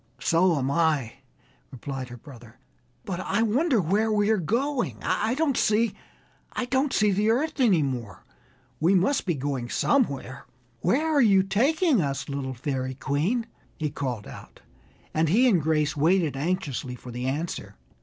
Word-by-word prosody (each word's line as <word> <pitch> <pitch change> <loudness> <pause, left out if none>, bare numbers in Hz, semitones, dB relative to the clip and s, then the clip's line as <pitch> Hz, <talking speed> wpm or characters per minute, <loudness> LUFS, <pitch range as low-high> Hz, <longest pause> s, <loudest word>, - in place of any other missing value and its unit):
"So 170 +2 +3
am 135 0 -1
I," 150 -7 +1 0.5
replied 130 0 -6
her 120 - -9
brother, 120 -3 -14 0.5
"but 185 -2 -4
I 200 +4 0
wonder 250 +4 +2
where 205 +6 +1
we 210 0 +2
are 220 - +3
going. 245 - -1
I 220 +4 0
don't 295 -2 +1
see 220 0 +2 0.6
the 235 -5 +1
earth 300 +7 0
any 200 - +4
more; 120 -8 -5 0.5
we 175 +5 +3
must 195 +6 +1
be 175 - +1
going 135 -3 -3
somewhere. 140 - 0 0.3
Where 255 - +1
are 285 - +5
you 195 -5 +5
taking 265 - +2
us, 140 -2 -3
little 135 -2 -4
Fairy 130 0 -3
Queen?" 160 - -1 0.3
he 150 -2 -2
called 125 -8 -4
out, - - -12 0.5
and 160 0 +1
he 235 +9 +4
and 190 -9 +3
Grace 150 0 +1
waited 160 0 +2
anxiously 145 -5 -2
for 125 0 -10
the 125 +2 -4
answer. 155 +6 -4
170 Hz, 150 wpm, -26 LUFS, 140-225 Hz, 0.6 s, are